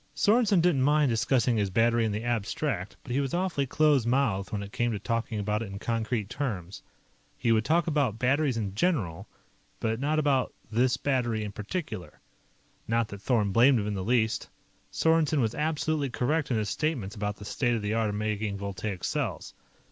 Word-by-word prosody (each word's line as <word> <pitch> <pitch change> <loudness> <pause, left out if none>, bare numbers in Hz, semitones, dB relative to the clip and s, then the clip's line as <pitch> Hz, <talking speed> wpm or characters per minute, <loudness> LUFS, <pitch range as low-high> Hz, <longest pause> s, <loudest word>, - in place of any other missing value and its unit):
Sorensen 205 0 +4
didn't 165 -6 +3
mind 145 0 +3
discussing 120 +1 +2
his 100 -2 +1
battery 115 +3 +3
in 110 - 0
the 105 +2 -3
abstract, 115 - -2
but - - -8
he 130 - +1
was 140 +2 -1
awfully 175 -7 0
close 150 -2 +3
mouthed 120 -5 0
when 100 -1 -2
it 100 - -9
came 120 +2 0
to 105 - -2
talking 115 +1 -2
about 105 +1 -1
it 115 - -4
in 100 0 -7
concrete 115 -1 -2
terms. 100 - -4 0.6
He 115 - +1
would 110 -1 +3
talk 160 +5 +2
about 145 -9 0
batteries 135 +1 +1
in 100 -4 -3
general, 105 - -1 0.5
but 110 0 -1
not 150 +3 0
about 140 -4 +1 0.2
this 120 +3 +2
battery 120 -6 0
in 105 - -4
particular. 105 - -5 0.7
Not 115 0 +1
that 100 -2 -8
Thorn 105 -4 +1
blamed 120 +4 +5
him 100 - -2
in 105 - -2
the 95 -2 -3
least. 110 0 +1 0.4
Sorensen 160 -2 +2
was 115 -4 +1
absolutely 155 -2 -1
correct 145 +6 0
in 120 - +1
his 105 -2 -1
statements 130 -8 -2
about 105 -1 -2
the 105 - -11
state 120 +2 0
of 110 - -3
the 105 +1 -1
art 110 -1 +1
of 105 - -3
making 105 -1 -2
voltaic 100 -1 -5
cells. - - -2
115 Hz, 195 wpm, -28 LUFS, 105-140 Hz, 0.7 s, blamed